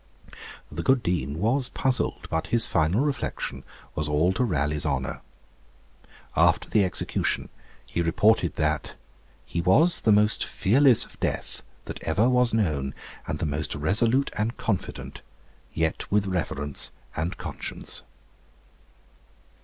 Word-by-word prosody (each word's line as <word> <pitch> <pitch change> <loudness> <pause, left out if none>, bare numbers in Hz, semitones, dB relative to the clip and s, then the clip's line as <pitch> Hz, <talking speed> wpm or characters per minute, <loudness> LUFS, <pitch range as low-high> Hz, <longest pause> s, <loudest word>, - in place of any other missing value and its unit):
The 75 +3 -4
good 130 +4 +3
Dean 75 -5 -1
was 125 +8 +1
puzzled; 130 -1 -1
but 80 - -1
his 115 -1 +4
final 80 +9 +2
reflection 145 -2 -3 0.3
was 75 -1 -2
all 80 +5 +2
to 125 - 0
Raleigh's 75 - 0
honour. 70 -3 -2 1.1
After - - +3
the 105 - +3
execution 90 - -1 0.4
he 85 - -2
reported 90 +2 +2
that 75 -1 -1 0.5
'he 85 - -2
was 140 - +4
the 110 - +3
most 105 +1 +4
fearless 125 +5 +4
of - - -19
death - - -2 0.2
that - - -7
ever 95 +9 +2
was 125 -1 +3
known, 75 -11 0 0.3
and - - -2
the - - -2
most 75 +1 -2
resolute 115 - +2
and 110 +4 -1
confident; 100 -5 -4 0.5
yet 80 0 -2
with 105 0 +3
reverence 75 -6 -1 0.2
and 85 +4 -2
conscience.' - - -4
95 Hz, 130 wpm, -26 LUFS, 75-115 Hz, 1.1 s, his